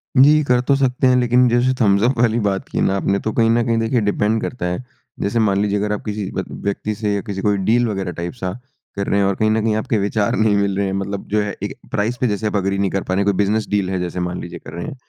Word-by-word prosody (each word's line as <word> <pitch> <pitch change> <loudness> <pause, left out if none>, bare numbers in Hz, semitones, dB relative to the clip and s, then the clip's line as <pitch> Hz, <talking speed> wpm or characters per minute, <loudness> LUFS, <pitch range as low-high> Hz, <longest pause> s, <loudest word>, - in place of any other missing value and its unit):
जी, 150 +3 +6
कर 125 -3 +2
तो 140 - +4
सकते 130 -1 +1
हैं, 130 - +4
लेकिन 125 +1 +4
जैसे 120 +2 +2
थम्स 100 -1 +4
अप 125 +2 +2
वाली 115 -1 +3
बात 95 - -3
की - - -2
ना 95 - +2
आपने, 100 +1 0
तो 110 - -2
कहीं 115 -1 +3
न 115 +1 +3
कहीं 115 -1 +1
देखिए 115 +1 +1
डिपेंड 105 +2 +1
करता 125 - -4
है। 90 +7 -2 0.4
जैसे 105 +4 0
मान 100 -2 +2
लीजिए 105 0 +1
अगर 105 +1 -1
आप 105 - -4
किसी 105 -2 -3
ब - - -3 0.2
व्यक्ति 100 +1 -2
से, 105 -1 -1
या 100 - -1
किसी 100 -2 -5
कोई 105 0 +1
डील 115 +5 +2
वग़ैरह 95 -4 -3
टाइप 85 +1 -5
सा 95 -6 -4 0.4
कर 100 0 -3
रहे 100 - +2
हैं 100 - +3
और 100 - 0
कहीं 110 0 +1
न 110 0 +1
कहीं 110 -1 +1
आपके 110 +1 0
विचार 100 +1 0
नहीं 110 -2 +2
मिल 100 -1 0
रहे 100 - +1
हैं, 95 - -2
मतलब 100 0 -4
जो 105 +1 +2
है 105 0 -3
एक - - -3 0.2
प्राइस 110 +4 -1
पे 125 - +3
जैसे 105 0 -1
आप 105 - -3
एग्री 100 0 0
नहीं 100 0 +1
कर 95 - -1
पा 95 - -3
रहे 95 - +1
हैं। - - 0
कोई 100 - +3
बिज़नेस 105 +1 +1
डील 100 -2 0
है 95 -1 -1
जैसे 90 0 -3
मान 90 0 -3
लीजिए 85 -1 -8
कर - - -12
रहे 85 - -5
हैं, 155 - -6
105 Hz, 300 wpm, -19 LUFS, 100-115 Hz, 0.4 s, जी